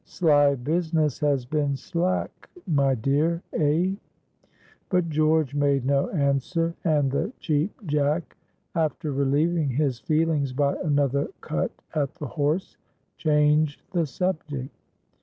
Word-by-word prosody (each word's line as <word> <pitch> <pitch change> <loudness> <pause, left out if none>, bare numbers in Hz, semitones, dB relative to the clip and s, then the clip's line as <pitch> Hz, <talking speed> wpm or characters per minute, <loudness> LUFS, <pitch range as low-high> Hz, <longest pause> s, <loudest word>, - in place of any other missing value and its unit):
"Sly 145 -4 +3
business 155 +2 0
has 140 -4 +1
been 145 +1 0
slack, 180 +4 -2 0.2
my 140 -5 +2
dear, 150 +8 0
eh?" 160 +4 +2 1.0
But 180 -2 +1
George 155 -2 +2
made 140 -2 +1
no 140 0 +2
answer, 165 +2 0
and 150 -5 +2
the 170 - -1
Cheap 160 +6 -2
Jack, 150 +2 0 0.4
after 155 -2 -1
relieving 145 +3 +1
his 135 -2 0
feelings 155 -3 +1
by 140 +1 +1
another 140 -2 +1
cut - - -1 0.2
at 145 -2 -1
the 165 -4 -6
horse, 150 +6 -1 0.4
changed 150 -1 +2
the 170 -4 0
subject. 145 -3 -3
150 Hz, 120 wpm, -25 LUFS, 140-165 Hz, 1.0 s, Sly